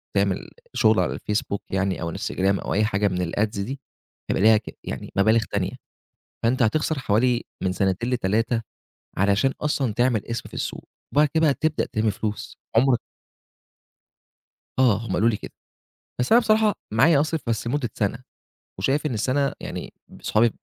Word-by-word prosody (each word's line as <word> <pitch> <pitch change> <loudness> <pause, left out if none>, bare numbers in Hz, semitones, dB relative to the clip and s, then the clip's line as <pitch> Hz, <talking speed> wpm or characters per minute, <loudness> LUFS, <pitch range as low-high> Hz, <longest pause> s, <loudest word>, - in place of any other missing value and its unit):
تعمل - - 0 0.2
شُغل 110 -2 +4
على 90 - 0
الFacebook 105 -1 -2
يعني 95 -1 -1
أو 85 -1 -3
الInstagram 95 +1 0
أو - - -1
أي 105 +2 +3
حاجة 105 -1 +1
من 90 -3 -2
الads 105 -1 0
دي، 130 +7 -4 0.5
هيبقى - - +1
ليها 110 0 +7
ك - - -8
يعني 65 - -6
مبالغ 110 +4 +4
تانية. - - -1 0.7
فأنت 120 +2 +2
هتخسر 150 +6 +1
حوالي 120 0 +2 0.2
من 95 - +1
سَنتين 95 +6 0
ل3 115 0 +1 0.5
علشان 100 +7 +3
أصلًا 140 -5 0
تعمل 120 -2 +1
اسم 115 0 -4
في - - -13
السوق - - -4 0.3
وبعد 150 +1 +4
كده 160 -2 +4
تبدأ 155 +2 0
تِلِم 110 0 +1
فلوس." 105 +1 -5 0.2
عُمرك 125 +1 +5 1.8
آه، 120 -6 +5
هم 95 - -3
قالوا 110 +6 +3
لي 105 - -1
كده. - - -9 0.7
بس 125 - +1
أنا 235 - +8
بصراحة 215 -2 +3 0.2
معايا 140 +7 +5
أصرف 155 +1 0
بس 115 -1 -1
لمُدّة 120 -2 -1
سَنة 105 +2 -1 0.6
وشايف 140 +10 +1
إن 130 - -1
السَنة 135 +6 +1
يعني - - -6 0.2
ب - - -15
أصحابي 115 +2 +3
115 Hz, 165 wpm, -24 LUFS, 100-135 Hz, 1.8 s, أنا